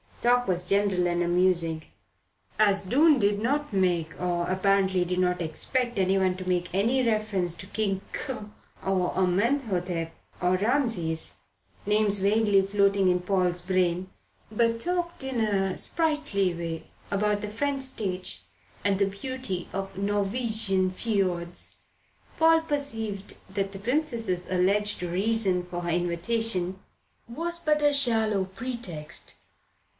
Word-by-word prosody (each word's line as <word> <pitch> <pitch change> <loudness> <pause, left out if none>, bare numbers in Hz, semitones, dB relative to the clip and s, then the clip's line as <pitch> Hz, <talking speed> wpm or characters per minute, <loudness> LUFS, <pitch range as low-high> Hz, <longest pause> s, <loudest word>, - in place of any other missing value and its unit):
Talk 245 +1 +3
was 180 -1 +1
general 195 -3 +2
and 175 0 0
amusing. 175 -2 +2 0.8
As 205 -2 +4
Doon 290 - +5
did 205 0 +2
not 285 +6 0
make, 175 -4 +1
and 175 0 -1
apparently 190 -1 +2
did 180 +1 -2
not 180 -1 +1
expect 240 +9 -2
anyone 190 -1 +2
to 185 0 -5
make 175 -1 -1
any 240 +6 +2
reference 215 -6 0
to - - -8
King 200 -2 -1
Qa 250 -7 -4 0.3
or 185 -2 0
Amenhotep 185 - 0 0.3
or 180 0 +2
Rameses 205 - 0 0.5
names 210 -1 +2
vaguely 205 0 +4
floating 195 -1 +2
in 180 0 +3
Paul's 180 -1 0
brain 180 0 0 0.4
but 230 +1 +1
talked 345 +1 -1
in 265 -3 -2
a 195 -4 +1
sprightly 300 - 0
way 165 -1 -4 0.3
about 205 +1 +1
the 210 - -3
French 275 +6 -1
stage 190 -8 -3 0.4
and 200 -1 +2
the 200 - +4
beauty 200 -2 -5
of 195 0 -4
Norwegian 200 -1 0
fiords, 185 -5 -2 0.6
Paul 325 0 +5
perceived 225 -10 -3 0.2
that 195 0 -1
the 195 - -6
Princess's 230 - -1
alleged 200 +3 +1
reason 190 +1 +1
for 175 0 -5
her 175 - -3
invitation 180 +2 0 0.5
was 335 +8 -3
but 305 -2 +1
a 290 0 +4
shallow 220 -7 +1
pretext. 190 -7 -5
195 Hz, 130 wpm, -27 LUFS, 180-230 Hz, 0.8 s, Doon